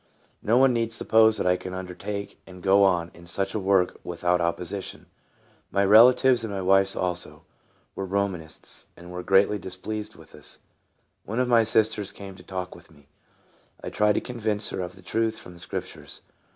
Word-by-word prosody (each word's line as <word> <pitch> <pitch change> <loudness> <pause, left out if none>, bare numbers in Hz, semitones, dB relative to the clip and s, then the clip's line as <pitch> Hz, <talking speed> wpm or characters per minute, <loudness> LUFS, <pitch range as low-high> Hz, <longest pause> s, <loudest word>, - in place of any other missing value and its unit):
No 115 +3 +2
one 130 0 +5
need 115 -1 -1
suppose 110 -1 +4
that - - -2
I 90 0 +4
could 95 0 -8
under 90 -1 -6
take 100 +2 -6
and 90 -1 -13
go 100 +1 +5
on 90 -3 +2
in 85 0 -15
such 95 +3 -2
a 110 - -1
work 95 -2 +1
without 90 +1 0
oppo 85 +1 -1
sition. 95 +2 -6 0.6
My 100 0 +1
relatives, 120 +4 +6
and 110 - -4
my 100 - -3
wife's 95 +1 +3
also, 90 -1 -4 0.5
were 95 - -5
Romanists, 95 -5 -4
and 85 +1 -12
were 90 0 -5
greatly 100 +2 +3
displeased 105 +4 -6
with - - -17
us. - - -9 0.7
One 115 +4 -4
of 125 - +1
my 120 -2 +5
sisters 110 -2 0
came 100 -1 -10
to 90 - -14
talk 95 -1 -5
with 85 -1 -16
me. 75 -2 -22 0.7
I - - -5
tried 105 0 +2
to - - -1
convince 110 -4 -3
her - - -3
of 90 +1 -6
the 95 - -17
truth 110 +3 -1
from 90 - -12
the 85 - -15
Scriptures. 85 - -7
95 Hz, 190 wpm, -25 LUFS, 90-110 Hz, 0.7 s, relatives